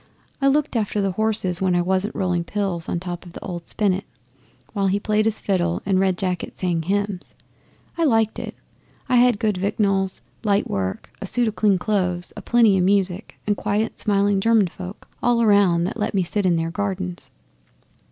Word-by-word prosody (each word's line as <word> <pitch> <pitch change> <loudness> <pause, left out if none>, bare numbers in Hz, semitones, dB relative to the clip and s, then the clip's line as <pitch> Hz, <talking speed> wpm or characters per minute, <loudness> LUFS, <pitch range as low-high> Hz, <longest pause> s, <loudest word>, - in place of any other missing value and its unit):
I 275 - +4
looked 290 0 +2
after 210 -2 0
the 195 -1 +1
horses 195 -3 -1
when 185 -2 +2
I 175 - +2
wasn't 190 +3 0
rolling 180 -3 0
pills 190 -3 -2
on 170 - -1
top 175 -1 -6
of 175 -2 -13
the - - -9
old 175 -2 -6
spinet, 200 -2 0 0.7
while 200 -2 +1
he 195 +2 +1
played 215 +1 +1
his 220 -1 +1
fiddle 175 -3 0
and 190 -1 +2
Red 190 -1 +2
Jacket 180 -2 -3
sang 175 -3 0
hymns. 200 +2 -2 0.6
I 335 - +3
liked 225 -5 +2
it. - - -6 0.5
I 250 - +3
had 245 -2 +5
good 210 -3 0
victuals, 195 -1 0 0.2
light 205 -1 +2
work, 95 -1 -3
a 200 - -4
suit 240 +4 +2
o' - - -3
clean 205 -2 +2
clothes, 180 -3 -1
a - - -7
plenty 225 -5 +4
music, 190 +1 +1
and 205 - +1
quiet, 210 +2 -1
smiling 200 -1 +2
German 225 -3 +4
folk 185 +3 -9
all 240 -1 +3
around 200 -6 +4
that 190 +6 -3
let 210 - -1
me 190 - +3
sit 190 +3 0
in 175 - +3
their 165 0 -1
gardens. 190 -2 -3
195 Hz, 190 wpm, -22 LUFS, 180-210 Hz, 0.7 s, had